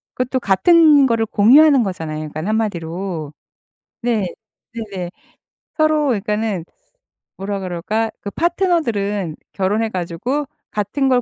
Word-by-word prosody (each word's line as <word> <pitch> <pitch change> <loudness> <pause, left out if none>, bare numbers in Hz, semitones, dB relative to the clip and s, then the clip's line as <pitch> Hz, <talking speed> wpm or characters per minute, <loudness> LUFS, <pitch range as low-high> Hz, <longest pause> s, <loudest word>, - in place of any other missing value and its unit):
그것도 255 +1 -1
같은 290 - +5
거를 230 -2 +1
공유하는 270 +7 +6
거잖아요 165 -6 -4
그니깐 155 +3 -5
1 215 - +1
마디로. 170 -6 -3 0.7
네. 230 -5 +1 0.5
네네. 200 -6 -5 0.7
서로 310 -1 +3
그러니까는 210 -5 -1 0.7
뭐라 200 +1 -3
그럴까? 195 +5 -2
그 205 - -5
파트너들은 235 - 0 0.2
결혼해 210 +4 0
가지고 190 - -2 0.3
같은 210 +7 -1
걸 250 -1 +3
210 Hz, 275 characters per minute, -19 LUFS, 185-260 Hz, 0.7 s, 공유하는